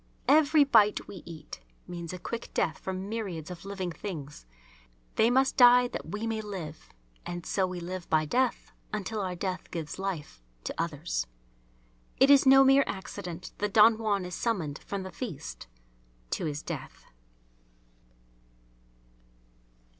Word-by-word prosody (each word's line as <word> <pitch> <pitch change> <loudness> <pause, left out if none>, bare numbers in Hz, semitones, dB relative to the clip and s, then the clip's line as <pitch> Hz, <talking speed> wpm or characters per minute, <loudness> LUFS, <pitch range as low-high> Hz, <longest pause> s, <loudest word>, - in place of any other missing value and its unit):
Every 300 +1 +6
bite 210 -7 +4
we 195 - -9
eat 160 -3 -9 0.3
means 170 -2 -6
a 185 - -5
quick 235 +6 -5
death 160 - 0
for 190 - -4
myriads 190 -4 -4
of 180 +1 -9
living 195 -3 -3
things. 150 - -7 0.7
They 225 - +4
must 265 +2 +2
die 245 -1 +7
that - - -6
we 210 +2 -3
may 225 -1 -1
live. 180 -7 -7 0.3
And 175 -1 -6
so 190 -2 +1
we 180 -1 -5
live 180 +1 -6
by 155 -1 +3
death 250 - 0 0.2
until 215 +1 -3
our 185 -2 -2
death 185 0 -4
gives 165 0 -5
life 165 - -4 0.2
to - - -3
others. 155 - -2 0.9
It's 275 0 +6
no 270 +1 +9
mere 270 +1 +6
accident 185 -2 -6
that 205 -1 -1
Don 220 +1 +7
Juan 205 -4 0
is 180 - -7
summoned 170 -10 -2
from 200 -1 -5
the 190 - -7
feast 160 - -7 0.6
to - - -1
his 150 -1 -3
death. - - -7
190 Hz, 145 wpm, -29 LUFS, 170-225 Hz, 0.9 s, no